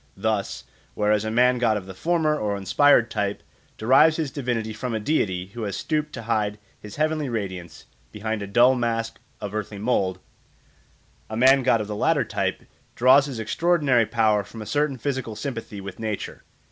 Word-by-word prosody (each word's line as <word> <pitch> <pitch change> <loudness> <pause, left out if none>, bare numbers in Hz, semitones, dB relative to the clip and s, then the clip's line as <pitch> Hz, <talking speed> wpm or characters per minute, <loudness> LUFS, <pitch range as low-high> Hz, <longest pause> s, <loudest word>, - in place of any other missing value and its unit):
Thus, - - -2 0.3
whereas 105 0 +2
a - - -1
man 125 +2 +3
god 115 -3 +2
of 95 - -7
the 95 - -9
former 160 - +1
or 105 -7 -2
inspired 115 +4 +3
type 100 -1 -2 0.3
derives 135 +8 +5
his 155 -5 -2
divinity 120 -5 -2
from 115 +2 -4
a - - -1
deity 95 -8 -1
who 120 - -6
has 100 -2 -3
stooped 150 -1 -2
to 115 - -6
hide 105 -2 -1 0.2
his 105 - -10
heavenly 155 -2 0
radiance 95 -7 -5 0.3
behind 110 0 -3
a 100 - -5
dull 120 +6 +5
mask 115 -2 -2 0.2
of 105 -1 -6
earthly 105 -1 -4
mould, 100 -4 0 1.1
a 110 - -4
man 135 +3 +6
god 120 -3 +2
of 105 - -5
the 105 - -4
latter - - +2
type - - -2 0.3
draws 130 +3 +5
his 135 -4 -6
extraordinary 135 0 +2
power 110 -2 +2
from 110 +3 -9
a - - -11
certain 145 +2 0
physical 130 -3 -3
sympathy 115 -3 -6
with 95 -1 -8
nature. 110 -2 -4
115 Hz, 180 wpm, -24 LUFS, 105-130 Hz, 1.1 s, man